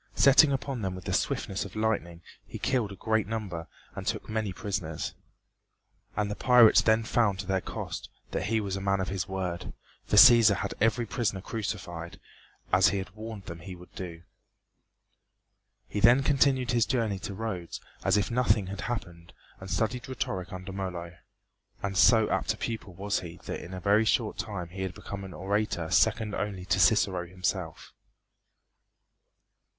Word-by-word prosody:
Setting 140 Hz, +2 st, +7 dB
upon 135 Hz, -2 st, -2 dB
them 95 Hz, -2 st, -2 dB
with 95 Hz, -, -9 dB
the -, -, -2 dB
swiftness 95 Hz, -, -1 dB
of 100 Hz, -, -10 dB
lightning 100 Hz, -6 st, -1 dB, 0.2 s
he -, -, -7 dB
killed 120 Hz, -6 st, 0 dB
a -, -, -7 dB
great 110 Hz, +1 st, 0 dB
number 100 Hz, -7 st, -4 dB, 0.3 s
and -, -, -5 dB
took -, -, -2 dB
many 110 Hz, -2 st, -2 dB
prisoners. 90 Hz, -5 st, -4 dB, 1.0 s
And 105 Hz, -1 st, -1 dB
the -, -, -2 dB
pirates 125 Hz, -2 st, +6 dB
then 110 Hz, 0 st, +3 dB
found 110 Hz, -3 st, +1 dB
to 95 Hz, -, -5 dB
their 95 Hz, 0 st, 0 dB
cost -, -, -6 dB, 0.2 s
that -, -, -2 dB
he 110 Hz, +1 st, +1 dB
was 100 Hz, -3 st, -3 dB
a 95 Hz, -, -4 dB
man 100 Hz, 0 st, +1 dB
of 95 Hz, -, -2 dB
his 95 Hz, 0 st, -2 dB
word, 95 Hz, -3 st, -4 dB, 0.3 s
for -, -, +1 dB
Cæsar 115 Hz, -3 st, +8 dB
had 100 Hz, -, -3 dB
every 115 Hz, +2 st, +2 dB
prisoner 105 Hz, -3 st, -1 dB
crucified, 90 Hz, -5 st, -5 dB, 0.5 s
as 95 Hz, +2 st, +6 dB
he 100 Hz, -, +1 dB
had 95 Hz, -1 st, -5 dB
warned 110 Hz, -1 st, -8 dB
them 85 Hz, -2 st, -7 dB
he 90 Hz, +3 st, -8 dB
would 90 Hz, 0 st, -15 dB
do. 85 Hz, -3 st, -7 dB, 1.6 s
He 105 Hz, -, -3 dB
then 120 Hz, +6 st, +6 dB
continued 135 Hz, -3 st, +2 dB
his 120 Hz, -2 st, +2 dB
journey 115 Hz, -7 st, 0 dB
to 100 Hz, -, -6 dB
Rhodes 95 Hz, -6 st, -4 dB, 0.2 s
as -, -, +3 dB
if 105 Hz, -, 0 dB
nothing 115 Hz, -4 st, +2 dB
had 100 Hz, -, -6 dB
happened 90 Hz, -8 st, -5 dB, 0.3 s
and 95 Hz, -, -9 dB
studied 120 Hz, +6 st, -1 dB
rhetoric 95 Hz, -7 st, -3 dB
under 95 Hz, +1 st, -7 dB
Molo; 90 Hz, -3 st, -5 dB, 0.7 s
and 100 Hz, -1 st, -2 dB
so 110 Hz, +2 st, +6 dB
apt -, -, 0 dB
a -, -, -19 dB
pupil 110 Hz, -5 st, -5 dB
was 100 Hz, +2 st, -1 dB
he 85 Hz, -1 st, -9 dB
that -, -, -5 dB
in 85 Hz, -, -9 dB
a -, -, -5 dB
very 100 Hz, +4 st, +3 dB
short 110 Hz, -1 st, +1 dB
time 90 Hz, -5 st, -4 dB
he 95 Hz, +2 st, -4 dB
became 100 Hz, +2 st, -7 dB
an 90 Hz, -3 st, -9 dB
orator 95 Hz, -2 st, -1 dB
second 105 Hz, +4 st, +3 dB
only 100 Hz, -3 st, -3 dB
to 95 Hz, +1 st, +1 dB
Cicero 95 Hz, -4 st, +3 dB
himself. 90 Hz, -2 st, -4 dB
100 Hz, 175 wpm, -28 LUFS, 90-110 Hz, 1.6 s, Cæsar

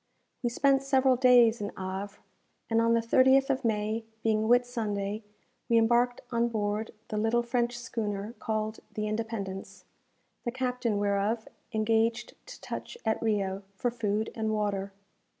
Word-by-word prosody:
We 240 Hz, -, 0 dB
spent 270 Hz, +3 st, +3 dB
several 265 Hz, -1 st, +3 dB
days 245 Hz, -3 st, +5 dB
in 205 Hz, -, -2 dB
Havre; 190 Hz, +1 st, -5 dB, 0.5 s
and 225 Hz, 0 st, +4 dB
on 230 Hz, 0 st, +3 dB
the 230 Hz, -, +3 dB
30th 265 Hz, +4 st, +4 dB
of 265 Hz, 0 st, -1 dB
May, 220 Hz, 0 st, 0 dB, 0.2 s
being 220 Hz, -1 st, +2 dB
Whitsunday, 220 Hz, -4 st, +1 dB, 0.5 s
we 230 Hz, -, +5 dB
embarked 240 Hz, +2 st, +3 dB
on 235 Hz, 0 st, +2 dB
board 215 Hz, -1 st, -2 dB, 0.2 s
the 215 Hz, -, -2 dB
little 225 Hz, +3 st, +2 dB
French 240 Hz, 0 st, 0 dB
schooner 215 Hz, -3 st, -4 dB
called 215 Hz, -1 st, -2 dB
the 215 Hz, 0 st, -3 dB
"Independence," 205 Hz, -3 st, -4 dB, 0.6 s
the 240 Hz, -, -2 dB
captain 250 Hz, -3 st, -1 dB
whereof 205 Hz, +3 st, 0 dB, 0.2 s
engaged 225 Hz, +1 st, +1 dB
to -, -, -10 dB
touch -, -, -6 dB
at 220 Hz, -, +1 dB
Rio 200 Hz, -3 st, 0 dB
for 245 Hz, +5 st, -1 dB
food 220 Hz, -2 st, -1 dB
and 220 Hz, -1 st, -2 dB
water. 200 Hz, -2 st, -1 dB
225 Hz, 145 wpm, -29 LUFS, 210-240 Hz, 0.6 s, days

